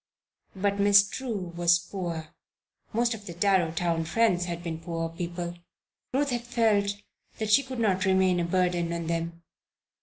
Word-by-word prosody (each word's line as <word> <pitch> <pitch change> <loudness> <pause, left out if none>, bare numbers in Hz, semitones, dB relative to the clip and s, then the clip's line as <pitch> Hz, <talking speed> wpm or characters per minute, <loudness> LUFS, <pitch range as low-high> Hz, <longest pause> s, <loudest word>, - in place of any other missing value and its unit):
But 200 +1 0
Miss 200 0 +6
True 210 -9 -4
was 175 0 +4
poor; 170 -3 -5 0.6
most 235 +1 +1
of 210 -2 -9
the 170 - -7
Darrowtown 170 -3 +1
friends 180 -3 +2
had 175 -1 -5
been 165 -2 -4
poor 165 0 -3
people. 175 0 -5 0.5
Ruth 280 +1 +1
had 240 -1 -1
felt 225 -4 +2 0.4
that 215 -1 -2
she 245 - +7
could 260 -2 -7
not 190 -4 +2
remain 190 -1 +3
a - - +1
burden 175 -1 +1
on 170 -1 -3
them. 170 0 -3
180 Hz, 155 wpm, -27 LUFS, 170-205 Hz, 0.6 s, she